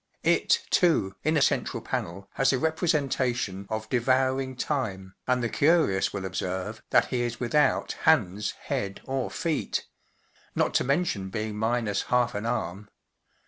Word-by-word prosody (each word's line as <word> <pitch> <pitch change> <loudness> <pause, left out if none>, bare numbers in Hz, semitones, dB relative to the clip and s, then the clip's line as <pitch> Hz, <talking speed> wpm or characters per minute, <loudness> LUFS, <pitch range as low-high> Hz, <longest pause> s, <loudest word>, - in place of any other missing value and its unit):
It, - - +3
too, 150 - +3
in 155 +1 +2
a 145 - +4
central - - 0
panel, 95 +4 -4
has 135 - +3
a 135 - +2
representation 130 - 0
of 110 0 -3
“Devouring 130 +2 +1
Time/* 100 -9 -3
and 125 -1 +2
the - - +2
curious 140 - +3
will 95 -1 -4
observe 95 +3 -3
that - - +4
he 125 -2 0
is 120 -1 -2
without 135 +3 +2
hands, 105 - +1
head, 100 -1 -3
or 135 -1 -2
feet—not 165 -3 -4
to - - +3
mention 135 - 0
being 110 +1 -3
minus 110 -2 0
half 125 -1 +2
an 105 +2 -3
arm. 105 -4 -3
120 Hz, 140 wpm, -27 LUFS, 100-135 Hz, -, a